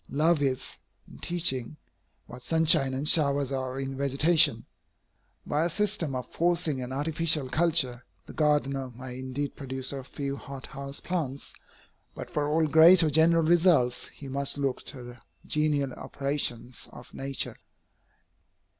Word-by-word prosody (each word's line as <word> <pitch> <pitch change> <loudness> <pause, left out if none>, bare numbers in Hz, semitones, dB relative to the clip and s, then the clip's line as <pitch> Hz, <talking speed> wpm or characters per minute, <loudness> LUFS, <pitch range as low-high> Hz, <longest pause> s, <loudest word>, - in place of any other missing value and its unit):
Love 155 +2 +2
is, 130 -2 -2 0.3
in - - -14
teaching, 150 -6 0 0.5
what 125 - -11
sunshine 160 -1 +3
and 140 +3 -2
showers 140 -3 +3
are 130 -1 -3
in 135 0 -4
vegetation. 140 -1 +3 0.8
By 150 +2 0
a 170 - 0
system 175 -6 -1
of 125 -1 -4
forcing 170 -5 0
and 125 0 -6
artificial 150 0 0
culture, 150 -6 +2 0.2
the - - -11
gardener 140 -3 0
may 125 0 -8
indeed 130 +2 -4
produce 130 -1 -4
a 135 -1 -6
few 140 +1 -5
hot 135 -2 -9
house 140 0 -6
plants, 145 -7 -4 0.6
but - - -8
for 145 -1 -1
all 160 +1 +2
great 165 +3 +7
or 155 - +1
general 165 +2 +4
results, 160 -7 +3
he 140 - -12
must 140 +1 -2
look 140 -2 -1
to 130 -4 -7
the 120 +1 -11 0.3
genial 150 -3 +1
operations 130 -4 -3
of 120 - -14
nature. 135 0 -3
140 Hz, 145 wpm, -27 LUFS, 130-160 Hz, 0.8 s, great